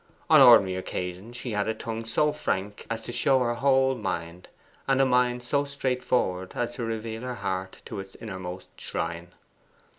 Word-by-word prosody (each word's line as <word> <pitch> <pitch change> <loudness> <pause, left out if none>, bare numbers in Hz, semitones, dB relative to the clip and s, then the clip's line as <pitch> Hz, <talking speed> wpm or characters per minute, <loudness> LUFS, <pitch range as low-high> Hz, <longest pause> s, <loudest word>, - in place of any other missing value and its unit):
On - - +9
ordinary 95 -2 +7
occasions 95 +5 -5
she 125 -1 -4
had 105 -1 0
a 110 - -1
tongue 115 0 -5
so 150 +7 +2
frank 105 -8 -3
as 115 0 -3
to - - -5
show 135 +2 +3
her 120 -1 +1
whole 135 +1 +3
mind, 85 -7 -4 0.4
and 135 -1 +3
a 135 - +5
mind 125 -1 +2
so 140 +4 +1
straightforward 125 -9 -1
as 120 0 -2
to 120 - -5
reveal 115 0 -4
her 125 0 -4
heart 95 -3 -4
to - - -6
its 95 0 -9
innermost 95 -4 -7
shrine. 85 +1 -4
115 Hz, 175 wpm, -27 LUFS, 95-125 Hz, 0.4 s, On